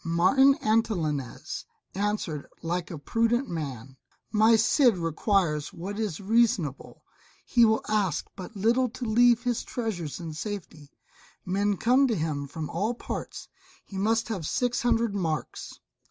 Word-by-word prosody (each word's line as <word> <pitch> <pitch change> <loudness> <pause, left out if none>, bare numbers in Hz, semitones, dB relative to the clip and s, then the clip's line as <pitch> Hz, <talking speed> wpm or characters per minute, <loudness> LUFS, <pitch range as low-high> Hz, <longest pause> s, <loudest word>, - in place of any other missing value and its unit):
Martin 260 +12 +4
Antolinez 165 - -1 0.3
answered 200 -7 -2 0.2
like 170 +1 -2
a 170 - -6
prudent 230 - 0
man, 135 -6 -6 0.4
"My 220 +1 +5
Cid 225 0 +4
requires 165 -2 0
what 200 +5 -6
is 205 -8 -2
reasonable; 200 - 0 0.4
he 235 -2 +5
will 220 0 +2
ask 205 -6 0
but 190 +3 -9
little 235 +5 +2
to 250 +2 -6
leave 240 +1 +4
his 245 -2 -1
treasures 180 - -4
in 165 -2 -6
safety. 165 -5 -7 0.6
Men 200 +2 0
come 255 +6 +4
to 230 - 0
him 155 -4 -2
from 155 +2 -5
all 210 +8 -1
parts. - - -6 0.4
He 195 - -6
must 225 +3 +1
have 185 -9 -3
six 245 -1 0
hundred 235 -3 +1
marks." 165 -6 -4
205 Hz, 140 wpm, -27 LUFS, 165-230 Hz, 0.6 s, My